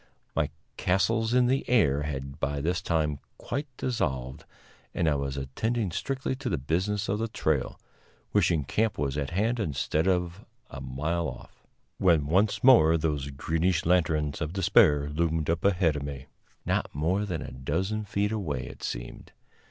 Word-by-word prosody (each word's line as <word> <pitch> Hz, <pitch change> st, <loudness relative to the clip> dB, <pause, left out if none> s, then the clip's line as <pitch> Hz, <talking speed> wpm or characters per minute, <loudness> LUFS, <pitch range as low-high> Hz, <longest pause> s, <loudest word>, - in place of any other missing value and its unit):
My -, -, +1 dB, 0.3 s
castles 110 Hz, +5 st, +1 dB
in 125 Hz, -1 st, +5 dB
the 130 Hz, +2 st, +2 dB
air 75 Hz, -, +3 dB
had 70 Hz, -2 st, -5 dB
by 70 Hz, 0 st, -1 dB
this 90 Hz, +5 st, -1 dB
time 75 Hz, -5 st, 0 dB, 0.2 s
quite 140 Hz, +5 st, -4 dB
dissolved, 65 Hz, -, -2 dB, 0.5 s
and 85 Hz, -, +1 dB
I 75 Hz, -, +4 dB
was 70 Hz, -1 st, -2 dB
attending 100 Hz, -, -1 dB
strictly 135 Hz, +7 st, -2 dB
to 135 Hz, -2 st, -3 dB
the -, -, 0 dB
business 90 Hz, +9 st, -1 dB
of 105 Hz, +2 st, 0 dB
the 115 Hz, -, 0 dB
trail, 80 Hz, -9 st, -1 dB, 0.5 s
wishing 80 Hz, -4 st, +3 dB
camp 110 Hz, -, 0 dB
was 70 Hz, -1 st, -1 dB
at 70 Hz, -2 st, -2 dB
hand 110 Hz, +8 st, 0 dB
instead 80 Hz, -1 st, 0 dB
of 90 Hz, +1 st, 0 dB, 0.3 s
a 65 Hz, -, -7 dB
mile 75 Hz, +6 st, -2 dB
off, -, -, -13 dB, 0.3 s
when 85 Hz, -6 st, +4 dB
once 95 Hz, +8 st, +2 dB
more 85 Hz, -11 st, +7 dB
those 75 Hz, -3 st, -1 dB
greenish 80 Hz, +5 st, 0 dB
lanterns 80 Hz, -4 st, +1 dB
of 80 Hz, +1 st, -2 dB
despair 80 Hz, -7 st, +4 dB
loomed 80 Hz, +1 st, 0 dB
up 85 Hz, -, -2 dB
ahead 90 Hz, -5 st, +3 dB
of 75 Hz, -, -3 dB
me 70 Hz, -1 st, -6 dB, 0.4 s
not -, -, 0 dB
more 85 Hz, +8 st, +1 dB
than 90 Hz, -6 st, -3 dB
a -, -, -8 dB
dozen 85 Hz, +12 st, -2 dB
feet 105 Hz, 0 st, -1 dB
away, 80 Hz, -12 st, -2 dB
it -, -, -10 dB
seemed. -, -, -6 dB
80 Hz, 165 wpm, -28 LUFS, 70-100 Hz, 0.5 s, more